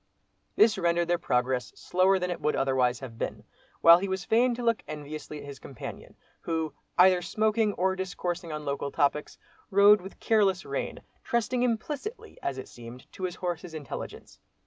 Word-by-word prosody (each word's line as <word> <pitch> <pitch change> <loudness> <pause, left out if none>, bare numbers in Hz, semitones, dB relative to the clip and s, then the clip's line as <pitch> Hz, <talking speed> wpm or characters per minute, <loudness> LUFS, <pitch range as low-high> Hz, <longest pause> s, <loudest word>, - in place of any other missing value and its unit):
This 220 - +5
rendered 170 0 +1
their 175 0 +2
progress 125 -4 0
slower 185 +2 +2
than 180 -1 -2
it 175 - -5
would 150 - +1
otherwise 130 -2 +1
have 115 -4 -9
been, - - -4 0.4
while 170 +1 +9
he 195 - -2
was 190 -1 -3
fain 240 +2 +3
to 245 - -5
look 230 -1 +2
enviously 150 0 -7
at 145 - -9
his 140 -1 -9
companion, 135 - -9 0.2
who, 160 -2 -2 0.2
either 180 0 +6
smoking 215 +4 +1
or 190 0 +1
discoursing 180 -2 -4
on 150 -1 -5
local 140 0 -2
topics, 145 +1 0 0.3
rode 200 0 +6
with 190 +2 -11
careless 195 -4 +2
rein, - - -4 0.2
trusting 235 0 0
implicitly, 295 - -3
as 135 -1 -3
it 130 - -7
seemed, 120 +1 -11
to 185 - -5
his 180 -1 -4
horse's 175 -2 -4
intelligence. 145 -5 -8
175 Hz, 170 wpm, -28 LUFS, 145-205 Hz, 0.4 s, while